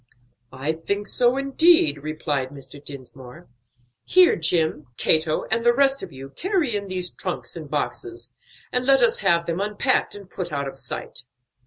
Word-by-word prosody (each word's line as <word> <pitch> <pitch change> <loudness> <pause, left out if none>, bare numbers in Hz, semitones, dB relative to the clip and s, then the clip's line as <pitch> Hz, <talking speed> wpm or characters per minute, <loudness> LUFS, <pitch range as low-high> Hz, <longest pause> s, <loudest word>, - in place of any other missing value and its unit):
"I 135 +4 -2
think 200 +6 -3
so, 245 +4 +2
indeed," 275 - +4
replied 150 -3 -2
Mr. 140 +1 -10
Dinsmore. 140 +3 -11 0.6
"Here, 365 -1 +5
Jim, 160 -2 0
Cato, 155 -1 +3
and 230 +1 +1
the 240 0 +4
rest 275 0 +3
of - - -7
you 135 0 -10
carry 355 - 0
in 200 -1 -3
these 185 -1 -3
trunks - - -5
and - - -8
boxes, 365 -1 -4 0.4
and 250 - 0
let 270 -2 +5
us 235 - +3
have 170 -4 +2
them 170 +2 -2
unpacked 210 +2 +1
and 200 -2 -11
put 180 -2 -6
out 140 -1 -2
of 135 - -8
sight." 125 - -6
180 Hz, 165 wpm, -23 LUFS, 150-250 Hz, 0.6 s, Here